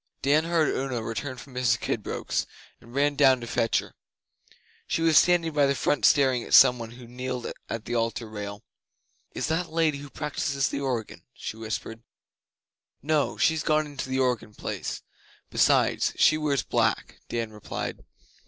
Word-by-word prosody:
Dan 150 +3 +3
heard 165 -3 +1
Una 130 -4 -2
return 130 +4 -4
from 130 +2 -12
Mrs 125 -2 +1
Kidbrooke's, - - -2 0.3
and 120 +2 -15
ran 145 +1 +2
down 135 -3 +5
to 120 - -7
fetch 115 0 +1
her. - - -4 0.9
She 165 - 0
was 165 -1 +4
standing 170 0 +4
by 145 -2 +4
the 140 - +1
font 145 +3 +1
staring 130 -4 +4
at - - +3
some 125 -1 +7
one 115 -1 -6
who 125 0 -12
kneeled 125 +1 -5 0.2
at 115 -1 -4
the 120 - -4
Altar 115 0 -1
rail. 105 -1 -7 0.7
'Is - - -1
that 165 +2 -1
the - - -19
Lady 155 -4 +2
who 145 0 -9
practises 140 -2 -2
the 140 - -3
organ?' 125 -5 -3
she - - -6
whispered. 115 0 -5 1.0
'No. 150 -1 +1
She's 160 -1 +2
gone 155 -1 +2
into 140 -3 -6
the 130 - -1
organ 125 -5 0
place. - - -5 0.5
Besides, - - +3
she 155 - +5
wears 145 -6 0
black,' - - 0
Dan 115 -2 -3
replied. 105 - -6
130 Hz, 170 wpm, -26 LUFS, 115-150 Hz, 1.0 s, some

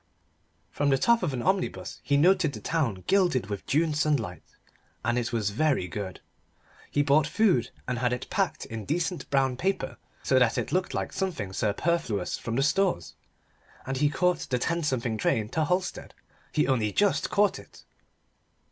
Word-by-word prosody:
From 145 0 0
the 135 - +4
top 235 - +3
of 175 -5 0
an 125 -2 -3
omnibus 190 0 -1
he 140 - +1
noted 175 -1 +4
the - - -6
town 125 - -1
gilded 175 - +2
with 100 - -5
June 155 +2 +2
sunlight. 140 - 0 0.6
And 120 0 +2
it 120 -1 -1
was 110 -4 0
very 135 -4 +1
good. 95 +1 -6 0.7
He 145 - +2
bought 145 +1 +3
food, 175 - +2 0.2
and 125 -1 -1
had 125 0 +1
it 125 - -3
packed - - -1
in 110 -1 -6
decent 170 - -2
brown 135 -2 +1
paper, 190 +7 -1 0.3
so 130 - +3
that 120 -2 +3
it - - -2
looked 185 +1 0
like - - -3
something 140 - -3
superfluous 110 - -1
from 115 - -4
the 135 - +2
stores. 175 - +1 0.7
And 135 0 -2
he 145 +2 +3
caught 180 +4 +1
the 125 - +1
ten 170 +7 -1
something 125 -7 -1
train 105 0 +1
to 160 +4 0
Halstead. 180 +1 -2 0.4
He 150 - +1
only 115 -6 +1
just 205 - +2
caught 205 -1 +2
it. - - -16
140 Hz, 175 wpm, -27 LUFS, 115-170 Hz, 0.7 s, the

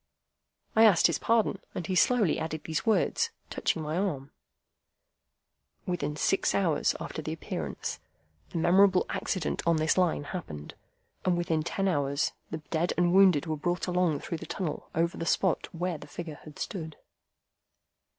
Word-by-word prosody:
I 220 - +7
asked 205 -6 +6
his - - +3
pardon, 225 -3 +2 0.2
and 175 - -3
he 190 - -2
slowly 210 -1 +3
added 160 -1 -4
these 160 +7 -3
words, 345 - +2 0.2
touching 160 - -1
my 155 +2 -2
arm,— 145 -9 -2 1.5
"Within 150 -5 -2
six 195 +5 +1
hours 165 -7 +2
after - - -5
the - - -4
Appearance, - - -4 0.5
the - - -5
memorable 185 +3 +5
accident 185 -5 -2
on 170 - +5
this 155 +4 +2
Line 175 -5 +2
happened, 110 - -7 0.5
and 180 -1 +2
within 165 -2 0
ten 195 +4 -1
hours 145 -4 +1 0.2
the 160 - -3
dead 170 +2 +1
and 175 0 +3
wounded 185 -6 +6
were 160 -1 -1
brought 175 +4 -1
along 180 -5 +1
through 165 - -4
the 165 - -8
tunnel 165 -3 -4
over 170 +1 +1
the - - -2
spot 190 -3 +1
where 175 -1 -3
the 150 - -11
figure 160 -1 -7
had 155 -1 -11
stood." 160 -5 -5
170 Hz, 160 wpm, -29 LUFS, 155-185 Hz, 1.5 s, I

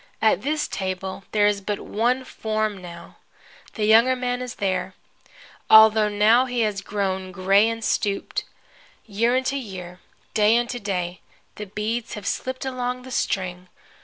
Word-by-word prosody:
At 220 - +3
this 300 +2 -1
table 190 0 -4
there 210 -1 +3
is 205 -1 +1
but 205 +1 -3
one 245 +4 0
form 215 -4 -3
now. 170 -1 -11 0.6
The 215 - 0
younger 230 +4 +5
man 250 0 -2
is 250 -1 -6
there, 185 -1 -2 0.7
although 220 -1 +7
now 215 +5 +4
he 245 -1 -1
has 210 -3 0
grown 190 -2 -3
gray 195 +3 +3
and 225 0 -5
stooped. 200 -1 -1 0.6
Year 230 +4 +1
unto 260 +2 -1
year, 185 -7 -8 0.3
day 215 +2 +4
unto 240 +1 -2
day, 180 -4 -3 0.3
the 210 - -8
beads 215 +4 -3
have 210 -3 -8
slipped 260 +4 -3
along 250 -1 -3
the 260 - -10
string. 185 -6 -2
210 Hz, 150 wpm, -23 LUFS, 195-240 Hz, 0.7 s, although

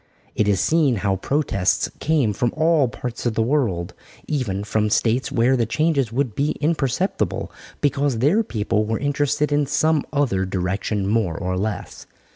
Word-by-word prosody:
It 105 - +1
is 100 -2 +2
seen 155 -6 +2
how 95 -1 +2
protests 100 -5 0
came 140 -8 +1
from 120 +4 0
all 160 -4 +3
parts 120 0 -5
of 115 - -1
the 115 - +2
world, 110 -10 0 0.3
even 110 -10 -2
from 105 0 0
States 120 +5 +1
where 130 0 +3
the 115 -3 0
changes 140 -2 +1
would 125 -2 -1
be 145 +6 0
imperceptible, 155 +3 -1 0.3
because 140 -2 +1
their 150 - +3
people 110 - -1
were 110 +1 -1
interested 145 +1 0
in 145 -1 +2
some 150 +1 +2
other 130 -10 +1
direction 95 +2 -2
more 100 -5 0
or 90 -1 -2
less. 100 0 -4
125 Hz, 160 wpm, -22 LUFS, 105-145 Hz, 0.3 s, all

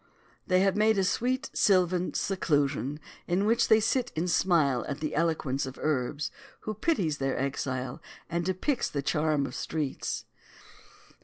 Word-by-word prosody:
They 185 -1 +4
have 195 0 +3
made 215 0 +3
a 195 - +3
sweet 255 +8 0
sylvan 185 -3 +2
seclusion, 145 -6 0 0.3
in 180 +3 +1
which 230 +2 +3
they 220 - +6
sit 245 +3 0
and 165 +3 -1
smile 160 -8 +2
at 140 0 -4
the 155 -1 -3
eloquence 155 -5 0
of 130 - -8
Urbs, 145 0 -1 0.3
who 215 - -3
pities 195 - 0
their 135 0 -1
exile 130 -2 -3 0.3
and 170 +1 -1
depicts 185 - 0
the 140 -1 -3
charm 150 0 +1
of 125 - -6
streets. 150 -1 -3
165 Hz, 150 wpm, -28 LUFS, 140-195 Hz, 0.3 s, they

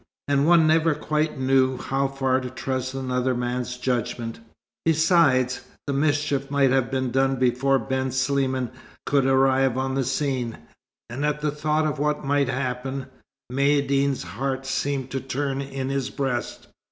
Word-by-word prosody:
And 140 +1 +2
one 170 -2 +6
never 160 0 +3
quite 150 -1 -1
knew 130 0 +3
how 135 +2 -1
far 135 -1 0
to 125 - -5
trust 130 0 -3
another 130 -1 -1
man's 125 +1 -2
judgment. 120 -2 -2 0.4
Besides, 160 -6 +3 0.2
the 140 - -2
mischief 145 -1 0
might 140 -2 +3
have 130 -3 +2
been 130 -2 -1
done 135 +1 +2
before 130 +2 +2
Ben 130 +2 -2
Sliman 130 -1 0 0.3
could 140 -2 +2
arrive 135 -1 +3
on 130 0 -1
the 135 0 +1
scene; 130 -3 -1 0.5
and 125 +5 -5
at 150 0 0
the 150 -1 0
thought 155 +1 0
of 150 -3 -2
what 150 0 0
might 140 -1 +2
happen, 130 +1 -3 0.5
Maïeddine's 140 -1 +2
heart 130 +9 -3
seemed 135 -1 -2
to 135 - -1
turn 135 +1 -2
in 135 -1 -4
his 135 -1 -1
breast. 135 -4 -3
135 Hz, 155 wpm, -24 LUFS, 130-140 Hz, 0.5 s, one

